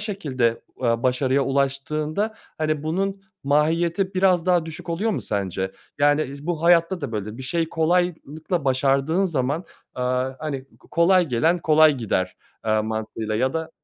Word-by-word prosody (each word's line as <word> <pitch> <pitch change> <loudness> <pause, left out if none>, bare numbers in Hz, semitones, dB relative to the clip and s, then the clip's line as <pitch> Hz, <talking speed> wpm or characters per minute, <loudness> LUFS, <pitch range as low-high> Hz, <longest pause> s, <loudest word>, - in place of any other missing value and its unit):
şekilde, 140 - -1 0.2
aaa, 115 -2 +1
başarıya 130 +2 +2
ulaştığında, 150 +9 -1 0.2
hani, 155 -1 0
bunun 195 +5 -2 0.2
mahiyeti 165 +6 +1
biraz 185 -2 +3
daha 175 -3 +3
düşük 160 +2 -9
oluyor 200 +7 0
mu - - -1
sence? 95 -2 -2 0.3
Yani, 145 +1 +4
iii, 140 +3 -9
bu 165 -2 -2
hayatta 170 +1 +4
da 140 -6 -4
böyle. 105 +1 -4
Bir - - -6
şeyi 165 +5 -1
kolaylıkla 165 -1 0
başardığın 135 +7 +2
zaman, 150 0 -1 0.3
aaa, 125 +1 0
hani, 140 -4 -4
ko - - -23
kolay 180 +1 +4
gelen 160 +8 +2
kolay 155 -2 +5
gider, 95 -6 -1 0.3
aaa, 110 -1 +2
mantığıyla 110 0 -3
ya 130 +3 +1
da 160 0 -3
150 Hz, 150 wpm, -23 LUFS, 130-170 Hz, 0.3 s, kolay